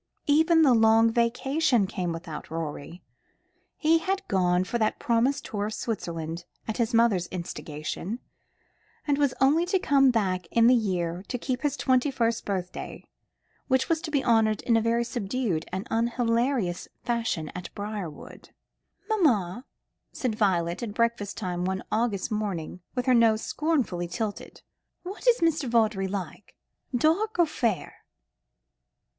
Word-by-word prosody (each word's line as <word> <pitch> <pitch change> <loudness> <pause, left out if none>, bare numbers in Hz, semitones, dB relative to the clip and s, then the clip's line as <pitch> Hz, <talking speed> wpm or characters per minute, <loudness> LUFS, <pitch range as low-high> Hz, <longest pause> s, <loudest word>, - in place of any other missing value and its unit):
Even 320 +3 +4
the 270 -4 +6
long 225 0 +5
vacation 245 +1 +2
came 180 -2 -3
without 165 -2 -7
Rorie. 165 +1 -6 0.7
He 325 +1 +3
had 385 +3 -2
gone 180 -2 +2
for 235 +6 -3
that 215 -1 +1
promised 250 +2 +1
tour 205 -1 -3
in - - -2
Switzerland, 170 -7 -4 0.2
at 220 - -3
his 235 -3 0
mother's 225 -7 +3
instigation, 170 +3 -5 0.9
and 290 -1 +1
was 285 -3 +2
only 285 +5 +4
to 380 +1 +2
come 275 -6 +4
back 190 -7 0
late - - -19
in 230 0 +5
the 245 - +7
year 180 -6 0
to 250 - -3
keep 250 +1 -3
his 290 -3 -1
twenty 260 +1 +2
first 235 -4 -1
birthday, 185 -3 -5 0.6
which 260 -1 +1
was 325 -1 +1
to - - -5
be 285 -3 0
honoured 220 -2 +3
in 235 - +2
a 225 - +4
very 230 +1 +1
subdued 230 -7 -2
and 190 +4 -4
unhilarious 230 -3 0 0.2
fashion 230 -10 -1
at 180 0 -8
Briarwood. 205 -6 -7 0.6
"Mamma," 250 - +1 0.5
said 250 -4 -2
Violet, 180 -5 0
at 220 -3 -5
breakfast 230 -4 0
time 180 -4 -3
one 190 +1 -2
August 220 -2 0
morning, 195 -5 -3
with 250 -1 -1
her 255 - +4
nose 225 -2 +4
scornfully 270 - -1
tilted, 215 +2 -5 0.4
"what 390 +7 -7
is 485 -5 +5
Mr. 315 -5 +1
Vawdrey 215 -4 +2
like 190 -1 -6 0.4
dark 335 - +1
or 345 - +5
fair?" 235 - -2
230 Hz, 150 wpm, -27 LUFS, 185-260 Hz, 0.9 s, the